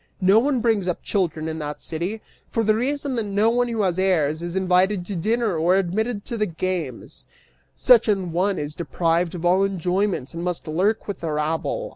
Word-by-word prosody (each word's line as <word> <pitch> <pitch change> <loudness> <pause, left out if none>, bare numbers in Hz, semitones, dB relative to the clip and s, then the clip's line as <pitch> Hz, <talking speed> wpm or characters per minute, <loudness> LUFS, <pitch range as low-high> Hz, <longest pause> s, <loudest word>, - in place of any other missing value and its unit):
No 195 +3 +5
one 260 0 +1
brings 220 -5 +1
up 180 - -2
children 170 -5 -1
in 160 0 -4
that 150 -1 -5
city, 180 +7 -4 0.3
for 230 - 0
the 215 0 +3
reason 275 +4 -1
that 225 - -1
no 205 +3 +2
one 245 +1 +1
who 225 -3 -1
has 185 -1 0
heirs 160 -5 +1
is 175 +1 -5
invited 185 0 +2
to 200 - -5
dinner 220 +3 0
or 170 +4 +3
admitted 200 +4 -1
to 235 - -4
the 215 -1 0
games; 170 -6 -4 0.5
such 240 -3 +5
an 195 -5 0
one 185 +3 0
is 145 0 -4
deprived 170 0 0
of 175 0 -5
all 185 +2 +4
enjoyments 185 -5 -1
and 170 0 -5
must 180 -2 -3
lurk 190 +8 0
with 200 -3 -4
the 165 -2 -3
rabble. 160 - -2
185 Hz, 200 wpm, -23 LUFS, 170-215 Hz, 0.5 s, No